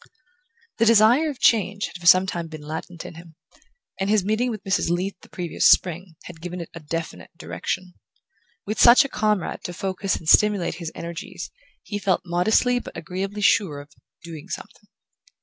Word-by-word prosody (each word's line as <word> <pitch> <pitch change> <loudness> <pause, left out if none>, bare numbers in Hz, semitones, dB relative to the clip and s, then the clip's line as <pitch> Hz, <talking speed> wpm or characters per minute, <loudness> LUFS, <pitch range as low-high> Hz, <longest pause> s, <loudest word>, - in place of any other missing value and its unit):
The 230 - +4
desire 230 +8 +5
for 270 - -12
change 205 -2 +2
had - - -8
for 175 - -4
some 185 +1 +7
time 170 -3 -4
been 155 -2 -10
latent 160 +3 -7
in - - -8
him, 165 -1 -14 0.6
and 195 +1 -1
his 210 -3 +2
meeting 220 +4 0
with 215 -5 -6
Mrs. 195 -3 0
Leath 180 +3 -1
the - - -17
previous 175 -3 +1
spring 175 -1 +2
had 165 -2 -12
given 180 +1 -6
it 170 - -8
a 170 - -8
definite 155 - -6
direction. 185 -1 -5 0.7
With 215 +2 -2
such 245 +4 +8
a - - -5
comrade 210 -6 -1
to 175 - -4
focus 190 +1 -2
and 160 - -9
stimulate 205 0 +4
his 165 - -5
energies 170 +6 -7 0.3
he 205 - -5
felt 195 -3 +1
modestly 220 +8 +2
but - - -10
agreeably 195 +3 -5
sure 195 -8 +2
of 145 +1 -13 0.3
"doing 165 -3 -9
something". - - -9
185 Hz, 180 wpm, -23 LUFS, 170-210 Hz, 0.7 s, such